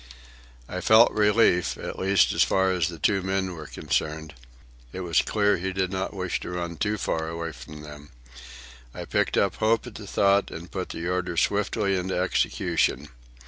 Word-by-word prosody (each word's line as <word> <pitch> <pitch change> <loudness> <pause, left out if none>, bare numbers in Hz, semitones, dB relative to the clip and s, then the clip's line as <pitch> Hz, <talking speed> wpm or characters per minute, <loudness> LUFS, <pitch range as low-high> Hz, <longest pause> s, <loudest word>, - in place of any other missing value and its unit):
I 90 - -5
felt 110 +4 +6
relief, 105 -4 +3
at - - -6
least 95 -2 +3
as - - +1
far 95 0 +3
as 90 -5 +1
the 85 - -7
two 100 +3 +1
men 95 0 -1
were 75 -3 -8
concerned. 80 0 -3 0.6
It 95 - -6
was 85 -3 +2
clear 105 -2 +1
he 95 +2 -3
did 95 -1 -1
not 95 +1 -3
wish 90 -2 -2
to - - -7
run 85 -1 -4
too 105 +4 -1
far 80 -5 -2
away 85 0 -4
from 75 +3 -11
them. 75 -1 -11 0.9
I - - -6
picked - - 0
up 100 -2 +1
hope 110 +2 +2
at 125 - -9
the 105 -1 -9
thought 100 +1 +2
and 85 +1 -9
put 95 -1 -4
the 85 +1 -5
order 90 -1 -2
swiftly 100 +1 +1
into 95 0 -2
execution. 75 -5 0
90 Hz, 185 wpm, -25 LUFS, 85-100 Hz, 0.9 s, felt